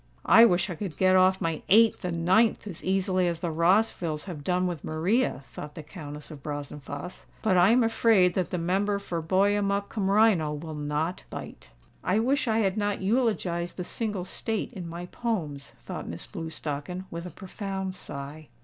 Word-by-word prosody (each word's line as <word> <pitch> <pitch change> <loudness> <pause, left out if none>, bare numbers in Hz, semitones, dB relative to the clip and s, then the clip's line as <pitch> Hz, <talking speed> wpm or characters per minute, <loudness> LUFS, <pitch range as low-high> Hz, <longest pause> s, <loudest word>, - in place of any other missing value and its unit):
"I 230 - +8
wish 180 -3 +2
I - - -2
could 170 -2 -6
get 185 0 +4
off 185 0 +5
my 165 -2 -2
eighth 225 +2 +5
and 170 -2 -2
ninth 220 +5 +3
as 180 -6 -8
easily 185 -1 +1
as 170 -1 -2
the 170 -3 -1
Rossvilles 170 -2 +2
have 165 -7 -7
done 180 +3 +1
with 175 -5 -3
Maria," 165 - 0
thought 150 0 -8
the 155 - -7
Countess 150 -2 -9
of 150 -2 -10
Brazenphace. 145 +2 -7 0.2
"But 215 -4 +3
I 180 +2 +6
am 240 +2 +5
afraid 225 -5 +4
that 185 -1 -1
the 180 - -2
member 195 +4 +1
for 175 -4 -4
Buyemup 200 +3 +1
cum 195 -3 -1
Rhino 200 -7 +4
will 160 +1 -7
not 150 +3 -2
bite." - - -9 0.3
"I 185 - +2
wish 260 +4 +1
I 225 0 +2
had 195 0 0
not 205 -1 -1
eulogised 195 -6 0
the 180 - -3
single 205 -2 -3
state 220 +5 -3
in 180 -5 -6
my 170 +1 -6
poems," 170 -10 -3
thought - - -7
Miss 85 - -6
Blewstocken, 160 +2 -5
with 170 +1 -5
a - - -6
profound 190 0 -5
sigh. 145 -2 -7
180 Hz, 185 wpm, -27 LUFS, 160-205 Hz, 0.3 s, I